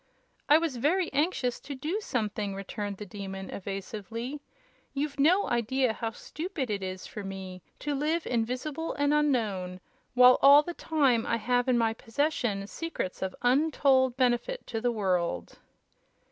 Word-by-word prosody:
"I 300 - +8
was 320 -6 -1
very 330 +8 +1
anxious 280 -4 0
to 280 0 -7
do 315 +11 -2
something," 210 - -2
returned 200 +1 -5
the 210 - -7
Demon, 195 0 -7
evasively. 215 +7 -5 0.5
"You've 285 0 -2
no 355 +8 +4
idea 240 +1 +1
how 225 +1 -3
stupid 305 - -5
it 200 -1 -2
is 185 0 -5
for 210 - -7
me 190 -1 -7 0.2
to 295 - -1
live 310 +4 0
invisible 255 +7 -2
and 285 0 +1
unknown, 215 -11 0 0.4
while 250 0 +7
all 285 +2 +8
the 345 - -5
time 275 -9 +1
I 230 - +1
have 245 +3 +1
in 255 -2 +3
my 225 -1 +2
possession 225 -4 -1
secrets 270 - -5
of 190 -1 -3
untold 260 -1 +3
benefit 255 - 0
to 225 -2 -4
the 245 +1 +1
world." 180 - -1
245 Hz, 150 wpm, -29 LUFS, 205-290 Hz, 0.5 s, I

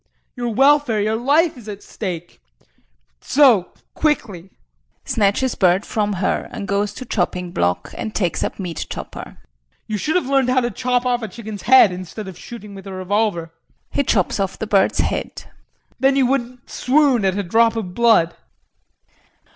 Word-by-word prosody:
Your 240 -2 -3
welfare, 270 -1 +3
your 215 +2 0
life, 290 +8 +2
is 230 -4 -11
at 205 -1 -8
stake. 175 - -6 0.8
So 255 -10 +4 0.3
quickly. 210 - -1 0.6
[Snatches 220 +4 +1
bird 185 +1 +2
from 210 -1 -1
her 190 0 -1
and 215 -5 -6
goes 200 +1 0
to 255 - -8
chopping 180 -4 -2
block 90 - -1
and 220 -2 -5
takes 180 -5 0
up - - -3
meat 175 -5 -5
chopper]. - - -8 0.5
You 215 - -3
should 310 - -1
have 360 - +2
learned 270 -1 +2
how 255 0 +3
to 240 0 -1
chop 250 +3 0
off 245 -1 +1
a 220 - -4
chicken's 215 0 -8
head 260 -6 +8
instead 185 +3 -7
of 190 - -8
shooting 210 +2 -10
with 195 0 -10
a 195 - -7
revolver. 185 -3 -1 0.4
[He - - +1
chops 210 -8 +1
off 195 -1 -2
the - - -4
bird's 200 -2 +2
head]. - - -3 0.6
Then 270 0 +3
you 270 -1 +3
wouldn't 250 -1 -2
swoon 265 -4 +2
at 190 0 +1
a 205 - -1
drop 225 +5 +3
of 195 -6 -4
blood. 220 -7 +4
215 Hz, 170 wpm, -20 LUFS, 190-250 Hz, 0.8 s, head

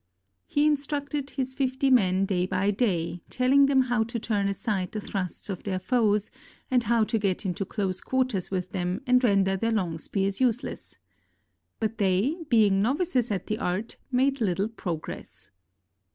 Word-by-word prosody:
He 290 +1 +2
instructed 285 -1 -1
his 260 -1 -3
fifty 265 +1 0
men 195 -6 +4
day 185 -2 0
by 190 +2 +1
day, 180 -6 -1
telling 270 +2 +4
them 270 -1 +4
how 245 -3 +1
to 235 +1 -4
turn 210 -3 0
aside 200 -2 -2
the 215 - -2
thrusts 195 -3 -4
of 195 -3 -4
their 190 -2 -2
foes 210 -1 +1 0.4
and 250 -1 +4
how 230 0 +2
to 220 +1 0
get 195 -1 -1
into 190 +1 -2
close 190 -2 -2
quarters 255 -8 -1
with 185 -2 -3
them 180 +3 -2
and 250 0 +4
render 195 -4 +3
their 225 +4 0
long 180 -7 -1
spears 195 +5 -1
useless. 250 0 -1 0.8
But 225 +1 -2
they, 200 - +2
being 210 -5 +4
novices 255 - +1
at 195 -4 -2
the 215 - -3
art, 185 +6 -2
made 265 +1 +2
little 195 0 +1
progress. 175 -8 -7
215 Hz, 165 wpm, -27 LUFS, 190-255 Hz, 0.8 s, men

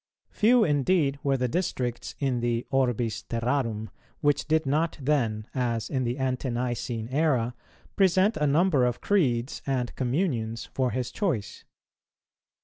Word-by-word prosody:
Few 235 +2 +4
indeed 145 -2 +2
were 135 -1 +1
the 125 0 0
districts 125 -6 -2
in 135 -4 0
the 120 0 -1
orbis 120 -4 0
terrarum, 115 -2 -2 0.3
which 145 0 +1
did 160 0 +2
not 155 +4 0
then, 120 -7 0
as 120 -3 -1
in 130 -3 0
the 120 +2 -2
Ante 130 0 -1
nicene 120 -2 -2
era, 130 -4 +1 0.4
present 190 +2 +3
a 150 -1 +1
number 150 -1 +3
of 125 -1 0
creeds 130 -11 +1
and 125 -3 -1
communions 120 - -1
for 130 -1 -1
his 125 -1 -3
choice. 160 - -2
130 Hz, 140 wpm, -27 LUFS, 120-150 Hz, 0.4 s, Few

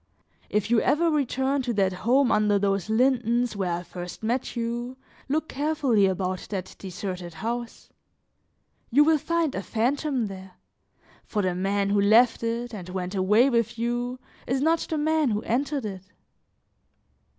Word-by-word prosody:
If 210 +1 -1
you 235 - +4
ever 330 +2 +2
return 275 -1 0
to 245 -2 -2
that 195 -3 +1
home 245 +7 +2
under 210 -1 +3
whose 195 -1 0
lindens, 240 -1 +2
where 190 -3 -1
I 175 +1 -3
first 180 +2 -8
met 240 +4 -1
you, 240 +2 -3 0.3
look 310 +3 0
carefully 275 -8 +2
about 185 0 -2
that 190 -3 -5
deserted 180 -2 -6
house; 230 +6 -5 1.0
you 285 +5 +5
will 315 0 +3
find 335 -1 0
a 190 - -3
fantom 255 +4 0
there, 190 -2 -9 0.7
for 210 -2 -2
the 185 -1 +1
man 195 +2 0
who 205 0 +3
left 225 +4 +5
it, 235 +1 -3
and 185 -4 -7
went 180 0 -4
away 210 +7 +4
with 235 -1 0
you, 240 +2 -2 0.3
is 260 +2 0
not 325 +4 +2
the 315 - -1
man 310 -1 +2
who 210 -1 -1
entered 275 +2 -1
it." 190 -3 -5
230 Hz, 155 wpm, -26 LUFS, 195-265 Hz, 1.0 s, you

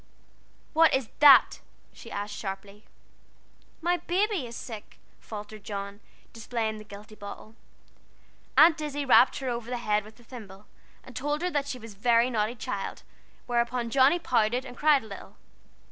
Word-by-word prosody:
"What 325 -2 +5
is 265 -4 -2
that?" 290 -2 +7 0.3
she - - -12
asked 205 +1 -5
sharply. 200 +1 -7 1.0
"My 350 +2 +1
baby 360 - -1
is 235 - -9
sick," 220 -4 -9 0.2
faltered 210 -1 -9
John, 200 0 -6 0.3
displaying 225 -1 -3
the - - -10
guilty 210 +1 -12
bottle. 210 +1 -10 1.0
Aunt 320 0 +7
Izzie 290 -1 -3
rapped 260 0 +5
her 265 -2 -3
over 235 -1 -4
the 250 - -2
head 210 -3 0
with 215 +3 -16
a - - -18
thimble, 210 -5 -12 0.4
and 260 - -14
told 295 +5 -2
her 360 - 0
that 285 -3 -1
she 270 - -4
was 225 -3 -11
a - - -24
very 235 +3 +3
naughty 220 +1 -1
child, 205 -3 -5 0.4
whereupon 235 0 -1
Johnnie 275 +6 +5
pouted, 245 -5 0
and 250 -1 -9
cried 295 -1 +3
a - - -11
little. 200 - -11
235 Hz, 160 wpm, -27 LUFS, 215-275 Hz, 1.0 s, that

